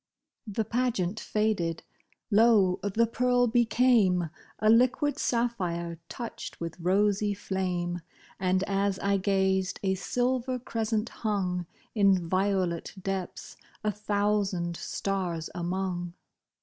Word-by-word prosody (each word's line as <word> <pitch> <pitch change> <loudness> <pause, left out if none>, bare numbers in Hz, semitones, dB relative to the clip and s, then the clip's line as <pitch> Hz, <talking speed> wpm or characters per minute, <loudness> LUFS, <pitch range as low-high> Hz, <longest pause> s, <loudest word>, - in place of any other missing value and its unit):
The 215 +1 -1
pageant 225 -4 0
faded. 205 -7 -1 0.5
Lo! 205 -4 +5
the 205 +3 +2
pearl 245 +2 +2
became 225 -7 +3 0.3
A 215 - 0
liquid 255 +6 +4
sapphire, 175 -9 -1
touched 235 -1 -7
with 170 +1 -5
rosy 205 +3 +2
flame; 180 -3 -2 0.4
And 185 0 +2
as 195 0 0
I 200 0 +1
gazed, 190 -1 +1
a 190 -1 +2
silver 250 +6 0
crescent 225 -2 -2
hung 185 -5 -2 0.3
In 200 -3 +5
violet 185 -2 0
depths, 190 -1 -5 0.3
a 210 - +1
thousand 205 -4 0
stars 180 -4 -3
among. 175 0 -2
195 Hz, 105 wpm, -28 LUFS, 180-225 Hz, 0.5 s, Lo